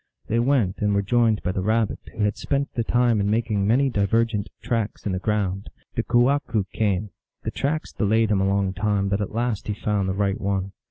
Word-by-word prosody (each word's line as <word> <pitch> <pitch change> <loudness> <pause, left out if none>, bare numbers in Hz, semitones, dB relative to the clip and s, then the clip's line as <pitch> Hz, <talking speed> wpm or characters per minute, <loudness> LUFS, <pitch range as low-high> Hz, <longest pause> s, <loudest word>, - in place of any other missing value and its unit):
They 115 - +1
went, 120 -7 +1
and 105 -1 +1
were 100 - +2
joined 110 -3 +2
by 90 - 0
the 95 - -2
Rabbit, 110 +1 +1
who 110 - -3
had 105 +1 +1
spent 140 0 -2
the 115 - -1
time 120 -2 +2
in 100 - 0
making 105 -2 +1
many 130 +6 +3
divergent 110 -2 +1
tracks 115 -3 -2
in 100 - 0
the 95 - -1
ground. 100 -1 -1 0.2
The - - 0
kewahqu 120 -1 +2
came. 105 -2 0 0.3
The - - -2
tracks 155 +3 -2
delayed 110 +1 +2
him 100 -2 +2
a 95 - +2
long 100 -1 +1
time, 100 0 0
but 100 +1 0
at 100 +1 -4
last 115 -3 -1
he 105 - -1
found 100 -2 -1
the 95 - -1
right 100 -1 0
one. 95 -1 -1
105 Hz, 215 wpm, -24 LUFS, 100-115 Hz, 0.3 s, many